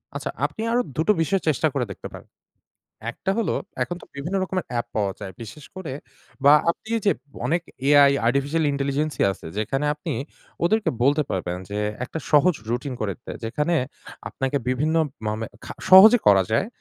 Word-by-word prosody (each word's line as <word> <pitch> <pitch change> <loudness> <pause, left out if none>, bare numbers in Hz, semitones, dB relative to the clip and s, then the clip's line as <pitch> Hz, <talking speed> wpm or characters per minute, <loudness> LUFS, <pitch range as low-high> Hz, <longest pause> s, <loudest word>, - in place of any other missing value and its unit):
আচ্ছা, - - -3 0.2
আপনি - - -4
আরো 240 +1 +3 0.2
দুটো 160 +7 +3
বিষয় 190 +4 +1
চেষ্টা 155 +1 +2
করে 130 -3 0
দেখতে - - -8
পারেন। - - -11 0.8
১ - - -17
টা - - +2
হলো 230 - 0 0.3
এখন 175 - -3
তো - - -9
বিভিন্ন 170 +8 -3
রকমের 185 0 -3
অ্যাপ 120 -1 -2
পাওয়া 100 -2 +1
যায়। 100 -2 -6
বিশেষ 120 +6 -10
করে 185 -8 -5 0.5
বা 140 - +8 0.2
আপনি 195 - -8 0.2
যে 200 - +6 0.3
অনেক 170 +1 +1 0.3
এ - - +5
আই, 140 - +5
আর্টিফিশিয়াল 140 +6 +1
ইন্টেলিজেন্সই 140 +2 0
আছে, 95 - -11
যেখানে 130 +7 -1
আপনি 150 +1 -5 0.5
ওদেরকে 215 +4 +2
বলতে 145 +4 +4
পারবেন 90 -1 -2
যে, 105 - -3 0.3
একটা 160 - -6
সহজ 155 +4 +5 0.2
রুটিন 125 +3 -2
করে 105 -2 -1
দিতে - - -9
যেখানে 150 +9 0 0.5
আপনাকে 135 +1 -2
বিভিন্ন 150 +6 +1 0.3
মানে 110 +1 -2 0.2
খা - - -7 0.2
সহজে 210 +6 +10
করা 100 -2 +7
যায় 115 - +2
145 Hz, 175 wpm, -24 LUFS, 120-170 Hz, 0.8 s, সহজে